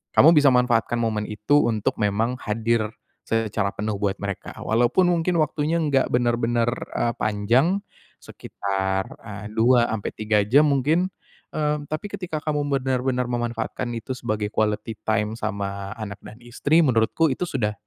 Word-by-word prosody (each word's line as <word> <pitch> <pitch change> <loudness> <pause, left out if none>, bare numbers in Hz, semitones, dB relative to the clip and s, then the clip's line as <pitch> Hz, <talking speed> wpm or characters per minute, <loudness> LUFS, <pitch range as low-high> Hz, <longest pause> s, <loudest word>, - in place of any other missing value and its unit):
Kamu 160 - +8
bisa 150 -3 +5
manfaatkan 125 -2 +2
momen 110 -2 -1
itu 105 +8 +2
untuk 110 -2 -1
memang 110 +5 0
hadir 110 +1 0 0.4
secara 110 -2 0
penuh 105 +1 -2
buat 100 -2 0
mereka. 100 -1 -6
Walaupun 120 +11 +2
mungkin 170 +1 0
waktunya 155 +2 0
enggak 145 -5 +1
bener-bener, 120 -1 +1 0.3
eee, 120 - +1
panjang 115 - +2 0.4
sekitar, 95 -1 -3 0.2
eee, 105 -2 -8
2 120 +2 +4
ampe 105 -2 -3
3 105 -1 +1
jam 145 +7 +5
mungkin. 155 +7 +1 0.4
Eee, 150 -1 0
tapi 155 +7 -4
ketika 180 -4 -4
kamu 150 -1 -1
benar-benar 130 -2 0
memanfaatkan 120 0 -3
itu 125 +3 -5
sebagai 110 -4 -2
quality 105 0 -1
time 110 0 0
sama 100 0 -4
anak 105 -3 -6
dan 110 - -11
istri, 140 +7 +2
menurutku 125 +6 +2
itu 180 - -3
sudah 115 -10 -1
115 Hz, 145 wpm, -23 LUFS, 105-140 Hz, 0.4 s, Kamu